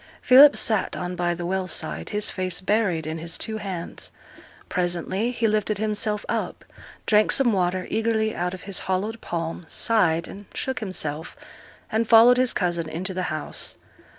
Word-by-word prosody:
Philip 280 +3 +8
sate 215 -4 +1
on 180 0 -4
by 175 0 -1
the 175 0 -5
well 190 +1 -1
side, 80 - -3
his 210 0 +1
face 185 -2 -2
buried 185 -5 0
in 160 +1 -4
his 165 +1 -4
two 220 -1 -3
hands. 190 -5 -6 0.6
Presently 180 +4 -1
he 240 -2 -2
lifted 215 -1 +1
himself 210 0 -1
up, - - -3 0.4
drank 210 0 +4
some 255 -5 +4
water 185 -1 0
eagerly 220 -1 0
out 180 +1 -2
of 185 - -12
his 195 -2 -2
hollowed 210 +5 -2
palm, 165 0 -4
sighed, 170 -8 +1
and 205 +1 -10
shook 265 -1 -3
himself, 160 -7 -4 0.6
and 220 +1 0
followed 235 +2 +7
his 255 -1 +3
cousin 170 -3 -1
into 185 +4 -3
the 185 - -3
house. 155 0 -2
190 Hz, 165 wpm, -24 LUFS, 175-220 Hz, 0.6 s, Philip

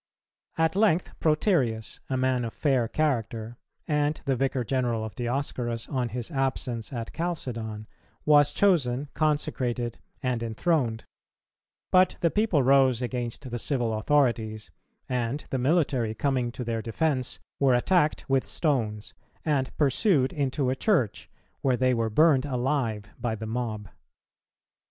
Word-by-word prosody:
At 160 +1 +2
length 195 -4 +2
Proterius, 150 - +1
a 130 - 0
man 130 -1 +1
of 115 - -5
fair 130 -6 +2
character, 115 -5 -1 0.3
and 150 -1 +1
the 135 -2 +1
Vicar 130 0 0
general 120 -3 -1
of 110 - -7
Dioscorus 120 -1 -3
on 125 -4 -1
his 120 +5 -5
absence 130 -5 -2
at 115 -3 -5
Chalcedon, 115 -11 -4 0.4
was 145 -1 +6
chosen, 145 -7 +2
consecrated, 130 -6 -1 0.2
and 125 -2 0
enthroned; 115 0 0 0.9
but 185 0 +4
the 170 - +3
people 210 -10 +2
rose 130 -2 +4
against 125 0 -4
the 120 - -3
civil 120 -3 0
authorities, 110 -3 +1 0.4
and 125 +3 -2
the 130 - 0
military, 130 -6 +1
coming 125 -1 0
to 125 - -5
their 115 -1 -2
defence, 130 +3 -1 0.2
were 135 -3 +4
attacked 155 +4 +2
with 135 -1 +2
stones, 110 -9 -1 0.3
and 140 -4 +1
pursued 145 - +2
into 135 -2 0
a - - 0
church, 135 - 0 0.3
where 130 -2 +2
they 130 0 +3
were 115 -2 0
burned 140 +3 +4
alive 125 -5 -1
by 115 -2 -1
the 110 0 -6
mob. 110 -2 -3
130 Hz, 135 wpm, -27 LUFS, 115-145 Hz, 0.9 s, was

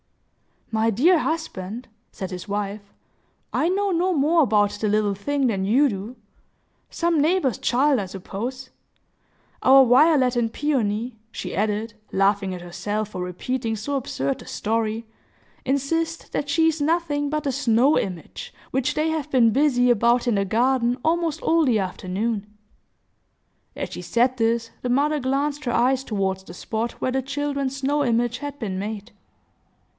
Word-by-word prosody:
"My 220 0 +2
dear 310 - +4
husband," 250 - -4 0.2
said 190 -1 -6
his 180 +2 -7
wife, 205 0 -3 0.7
"I 320 - +2
know 395 +2 +1
no 365 +2 +1
more 320 +2 +3
about 205 -4 +3
the 215 +1 -3
little 210 -1 +2
thing 275 +8 -1
than 195 -5 -1
you 265 +8 +4
do. 205 +3 -6 0.7
Some 335 -3 +1
neighbor's 305 - +2
child, 270 +2 +2
I 200 - -2
suppose. 235 +8 -6 0.9
Our 270 0 +7
Violet 260 0 +4
and 230 -2 +1
Peony," 235 -5 -1
she - - -6
added, 215 +2 -1 0.2
laughing 195 0 +1
at 180 - -8
herself 205 +4 -3
for 185 - -6
repeating 225 +6 -3
so 250 +7 -3
absurd 140 - -2
a - - -13
story, 225 +1 -2 0.6
"insist 325 +5 -1
that 290 - -2
she 325 +3 +3
is 320 -1 -3
nothing 295 -2 0
but 305 0 -2
a 275 - +1
snow 255 +1 +3
image, 180 -5 -6 0.2
which 265 +3 0
they 310 +1 +1
have 315 -2 -2
been 240 -5 +4
busy 250 -1 +3
about 235 +2 +3
in 240 -3 +2
the 200 0 +1
garden, 245 +3 +1
almost 330 -1 0
all 330 -1 +3
the 235 -5 +3
afternoon." 195 +3 -3 1.3
As - - -4
she - - -6
said 250 +2 +1
this, 230 0 0
the 250 - -3
mother 295 +4 +2
glanced 280 +2 -1
her 240 - 0
eyes 255 +2 +2
toward 195 -5 -1
the 190 - -12
spot 225 +5 -3
where 255 - -2
the 265 +1 0
children's 280 0 -2
snow 280 +2 0
image 240 -1 +1
had 285 +1 -6
been 195 -8 -4
made. 210 +2 -5
245 Hz, 160 wpm, -23 LUFS, 210-290 Hz, 1.3 s, Our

